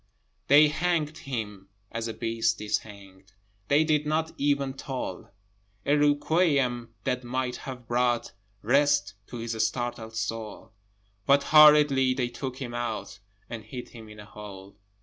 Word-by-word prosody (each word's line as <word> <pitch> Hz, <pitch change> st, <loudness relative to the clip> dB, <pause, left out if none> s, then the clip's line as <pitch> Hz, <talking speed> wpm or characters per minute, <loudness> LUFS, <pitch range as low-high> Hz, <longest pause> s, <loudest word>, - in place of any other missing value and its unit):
They 150 Hz, +2 st, +7 dB
hanged 160 Hz, -1 st, -1 dB
him 105 Hz, -9 st, -6 dB, 0.2 s
as 115 Hz, 0 st, -3 dB
a 115 Hz, -, -4 dB
beast 115 Hz, 0 st, -1 dB
is 105 Hz, 0 st, 0 dB
hanged: 100 Hz, -2 st, -15 dB, 0.3 s
They 145 Hz, +2 st, +4 dB
did 150 Hz, -1 st, +1 dB
not 160 Hz, +1 st, 0 dB
even 140 Hz, -1 st, 0 dB
toll 130 Hz, -8 st, -6 dB, 0.6 s
A 145 Hz, -, +3 dB
requiem 145 Hz, -5 st, +1 dB
that 125 Hz, -1 st, -1 dB
might 125 Hz, 0 st, -2 dB
have 125 Hz, -2 st, -8 dB
brought 120 Hz, 0 st, 0 dB, 0.3 s
Rest 140 Hz, -3 st, +2 dB
to 120 Hz, -, -8 dB
his 115 Hz, 0 st, -4 dB
startled 115 Hz, -1 st, -5 dB
soul, 110 Hz, -1 st, -5 dB, 0.6 s
But 140 Hz, +1 st, +5 dB
hurriedly 150 Hz, -4 st, +6 dB
they 125 Hz, -2 st, -1 dB
took 125 Hz, +1 st, -6 dB
him 120 Hz, -3 st, -6 dB
out, 120 Hz, 0 st, -4 dB, 0.3 s
And 115 Hz, -2 st, -7 dB
hid 125 Hz, +3 st, -8 dB
him 110 Hz, -2 st, -12 dB
in 105 Hz, 0 st, -12 dB
a 105 Hz, -, -10 dB
hole. 100 Hz, -2 st, -11 dB
125 Hz, 145 wpm, -27 LUFS, 115-145 Hz, 0.6 s, They